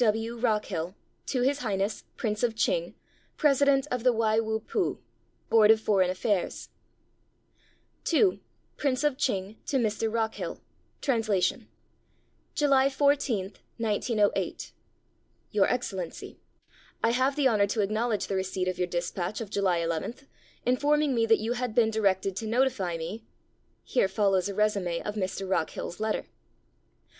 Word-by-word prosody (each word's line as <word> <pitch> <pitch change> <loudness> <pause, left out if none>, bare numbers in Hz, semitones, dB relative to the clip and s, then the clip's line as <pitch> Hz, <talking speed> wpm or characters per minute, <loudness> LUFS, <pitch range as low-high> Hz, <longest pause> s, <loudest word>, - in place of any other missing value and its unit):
W. 225 +1 +1
W. 230 - -10
ROCKHILL. 205 -6 0 0.3
To 255 - 0
His 280 +2 +2
Highness, 205 -4 -2
Prince 215 -2 -2
of 235 -2 +1
Ch'ing, - - 0 0.4
President 280 -1 +4
of 250 -2 -1
the 250 - +5
Wai 220 -1 +2
Wu 220 -1 -1
Pu 380 - -1 0.5
[Board 215 -2 +5
of 220 0 +7
Foreign 195 -4 +2
Affairs], 185 +1 -1 1.4
II 370 +3 +3 0.4
PRINCE 270 -1 0
OF 295 -3 +1
ch'ing 205 -5 -1
TO 275 - +1
MR. 220 -2 0
ROCKHILL 225 -1 -2 0.4
(Translation) 220 - +1 0.9
July 275 -2 +4
14, 265 -8 +1 0.3
igo8. 215 -1 0 0.8
Your - - +3
Excellency: - - -4 0.3
— - - -29
I 230 - +4
have 260 +3 +2
the 290 -3 +3
honor 210 -5 +3
to 215 +2 0
acknowledge 215 0 0
the 195 - -4
receipt 190 -1 -2
of 185 -1 -2
your 180 - +1
dispatch 175 +2 -3
of 220 -4 -6
July 190 -4 +1
11, 165 +6 -2 0.5
informing 290 +3 +2
me 230 -2 +2
that 225 0 +5
you 225 +2 -2
had 245 -2 -3
been 225 -2 +4
directed 195 -3 +1
to 220 - -3
notify 225 -7 +1
me... 175 +8 -6 0.6
[Here 245 - +2
follows 195 -1 +1
a 200 - -5
resume 200 -5 0
of 210 - -3
Mr. 195 -1 -3
Rockhill's 175 0 -2
letter. 220 0 -1
220 Hz, 145 wpm, -28 LUFS, 195-250 Hz, 1.4 s, of